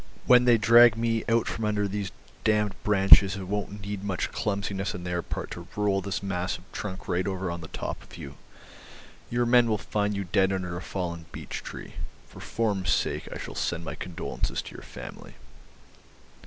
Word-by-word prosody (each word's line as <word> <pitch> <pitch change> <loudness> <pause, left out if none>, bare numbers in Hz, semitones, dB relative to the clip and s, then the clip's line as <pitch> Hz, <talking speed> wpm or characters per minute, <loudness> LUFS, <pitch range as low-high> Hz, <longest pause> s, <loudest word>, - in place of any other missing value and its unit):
When 125 0 +7
they 120 -2 +6
drag 115 +1 +7
me 115 -1 0
out 115 0 +3
from 110 - -3
under 105 -1 +1
these 100 -1 -3 0.3
damned 105 -2 +2
branches 100 -1 +7
it 100 - -5
won't 105 +1 -3
need 100 0 -5
much 100 -3 -2
clumsiness 100 -1 -2
on 90 - -6
their 90 -1 -1
part - - -5
to 85 0 -7
roll 100 -2 +1
this 100 0 -3
mass 90 -1 -2
of 85 - -17
trunk 95 -2 -6
right 90 -1 0
over 95 -2 -2
on 85 0 -5
the 80 - -8
top - - -5
of - - -13
you. 70 0 -8 0.9
Your 120 0 +1
men 120 -1 +5
will 110 - +2
find 105 +1 -1
you 100 - -2
dead 95 +2 +2
under 90 -2 -2
a 85 - -5
fallen 85 -4 -4
beech - - -6
tree. - - -8 0.3
For - - -13
form's 105 -5 -1
sake - - 0
I - - -5
shall - - -7
send 85 -1 -2
my - - -4
condolences 90 -1 -4
to - - -10
your - - -9
family." - - -10
100 Hz, 195 wpm, -27 LUFS, 90-105 Hz, 0.9 s, When